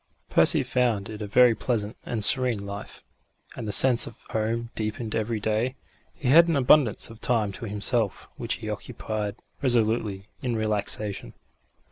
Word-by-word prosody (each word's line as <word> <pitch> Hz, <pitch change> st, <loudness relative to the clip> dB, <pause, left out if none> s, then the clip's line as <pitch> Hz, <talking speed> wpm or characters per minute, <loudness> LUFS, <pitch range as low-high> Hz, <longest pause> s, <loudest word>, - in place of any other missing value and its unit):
Percy -, -, +4 dB
found 115 Hz, -6 st, -1 dB
it 110 Hz, 0 st, -8 dB
a 105 Hz, -, -5 dB
very 125 Hz, +3 st, +4 dB
pleasant 110 Hz, -3 st, -3 dB
and 110 Hz, -3 st, +1 dB
serene 120 Hz, -4 st, +2 dB
life, 100 Hz, 0 st, -9 dB, 0.5 s
and 110 Hz, -, -7 dB
the -, -, -2 dB
sense 125 Hz, +1 st, +7 dB
of 115 Hz, -, -11 dB
home 115 Hz, +2 st, -3 dB
deepened 110 Hz, +1 st, -4 dB
every 110 Hz, 0 st, -2 dB
day. 110 Hz, +5 st, -2 dB, 0.4 s
He 130 Hz, -, -3 dB
had 165 Hz, +5 st, +6 dB
an 165 Hz, -, 0 dB
abundance 130 Hz, -4 st, +2 dB
of 115 Hz, 0 st, -15 dB
time 110 Hz, -5 st, 0 dB
to 105 Hz, -, -8 dB
himself, 105 Hz, +1 st, +1 dB
which -, -, -3 dB
he -, -, -9 dB
occupied 105 Hz, -2 st, -5 dB, 0.3 s
resolutely 110 Hz, -6 st, 0 dB, 0.2 s
in 125 Hz, -2 st, -2 dB
relaxation. 105 Hz, -, -1 dB
110 Hz, 155 wpm, -25 LUFS, 105-120 Hz, 0.5 s, sense